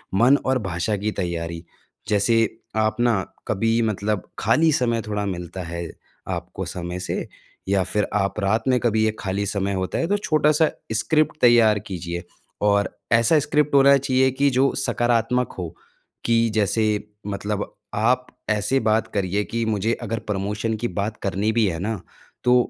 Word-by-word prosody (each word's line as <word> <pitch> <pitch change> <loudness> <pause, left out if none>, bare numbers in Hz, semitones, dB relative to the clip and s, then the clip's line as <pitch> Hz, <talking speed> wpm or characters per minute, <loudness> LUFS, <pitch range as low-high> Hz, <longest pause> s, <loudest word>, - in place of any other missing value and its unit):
मन 125 +8 +5
और 130 0 +2
भाषा 95 +2 -1
की 105 +2 -2
तैयारी। 85 -1 -4 0.4
जैसे 105 +3 +2 0.4
आप 110 -1 +2
अपना 115 -3 +2 0.3
कभी 115 +3 +1
मतलब 105 -2 -1
खाली 155 +9 +3
समय 120 -4 +1
थोड़ा 105 -1 -2
मिलता 90 -1 -5
है 85 0 -5 0.4
आपको - - -4
समय 90 0 -5
से 90 - -3 0.4
या 95 -1 +2
फिर 105 +2 -1
आप 100 0 0
रात 105 +3 +1
में 130 -1 +3
कभी 110 -2 +1
ये 110 - +2
खाली 100 +1 -2
समय 100 0 -1
होता 95 -1 -2
है 165 - 0
तो 205 +3 +2
छोटा-सा 155 -4 +3 0.2
स्क्रिप्ट 155 +8 +1
तैयार 115 -3 +6
कीजिए। 85 -2 -5 0.4
और 100 0 +3 0.2
ऐसा 115 +7 +5
स्क्रिप्ट 150 0 +1
होना 140 0 +7
चाहिए 130 -1 +2
कि 140 +2 +2
जो 135 +1 +2
सकारात्मक 120 0 +1
हो। 90 -3 -4 0.6
कि 115 - +3 0.2
जैसे 110 +1 +2 0.4
मतलब 105 +1 -2 0.3
आप 125 +4 +2 0.2
ऐसे 105 +5 +2
बात 110 +1 +2
करिए 100 0 0
कि 115 0 -2
मुझे 110 +1 0
अगर 115 0 -2
प्रमोशन 105 +3 -1
की - - +2
बात 105 +2 -2
करनी 100 +3 0
भी 115 -1 +3
है 85 -3 -2
ना 105 +2 -2 0.4
तो 125 0 +5
110 Hz, 160 wpm, -23 LUFS, 100-120 Hz, 0.6 s, होना